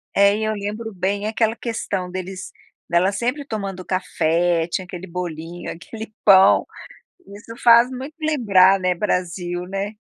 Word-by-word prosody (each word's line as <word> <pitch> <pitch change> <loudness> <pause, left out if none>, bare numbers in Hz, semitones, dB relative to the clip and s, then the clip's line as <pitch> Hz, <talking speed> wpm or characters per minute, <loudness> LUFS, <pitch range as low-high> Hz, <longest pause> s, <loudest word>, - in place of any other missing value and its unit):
É, 200 +1 +5
e 220 - -3
eu 215 0 0
lembro 215 +2 -5
bem 195 +2 -2
aquela 220 0 0
questão 225 -6 -4
deles 185 +1 -6 0.4
dela 175 +3 +2
sempre 245 +8 -2
tomando 195 -6 -5
café, 170 -2 0
tinha 185 +2 -3
aquele 180 +1 -8
bolinho, 170 -1 -6
aquele 220 +5 -9
pão, 195 -1 +6 0.7
isso 220 +3 -11
faz 235 +1 +6
muito 260 +4 -7
lembrar, 200 -11 +4
né, 185 -1 0
Brasil, 175 -1 -2
né. 195 +2 -4
195 Hz, 145 wpm, -21 LUFS, 180-220 Hz, 0.7 s, pão